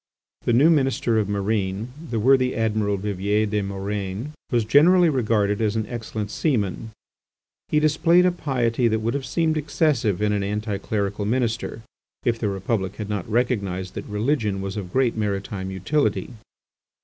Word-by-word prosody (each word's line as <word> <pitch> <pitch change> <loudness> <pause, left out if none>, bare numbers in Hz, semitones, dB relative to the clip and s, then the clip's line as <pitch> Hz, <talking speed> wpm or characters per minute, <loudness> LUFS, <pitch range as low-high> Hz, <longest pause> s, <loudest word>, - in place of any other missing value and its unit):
The 120 - +2
new 145 +8 +6
Minister 130 -6 +2
of 105 -2 -1
Marine, 100 +1 -1 0.2
the 115 - -1
worthy 130 +2 +3
Admiral 105 -2 0
Vivier 100 +2 0
des 105 0 -1
Murènes, 100 +4 -4 0.2
was 120 -3 +1
generally 170 +8 +5
regarded 110 -6 +1
as 110 -1 +1
an 110 -1 0
excellent 110 -2 -5
seaman. 110 - -1 0.8
He 150 - +2
displayed 165 +4 +4
a 180 - +4
piety 125 -7 0
that 110 -1 +1
would 110 +2 -1
have 135 -3 -3
seemed 160 +3 +1
excessive 145 - +1
in 105 0 +1
an 100 - 0
anti 105 0 -2
clerical 100 0 -2
minister, 115 0 -1 0.4
if 115 -1 +1
the 105 - 0
Republic 95 0 -2
had 105 -2 -6
not 105 -1 -3
recognised 100 -6 -1
that - - -6
religion 105 -1 0
was 95 0 -4
of 95 -4 -5
great 130 -3 +2
maritime 100 -2 -3
utility. 100 - -1
110 Hz, 160 wpm, -23 LUFS, 100-125 Hz, 0.8 s, new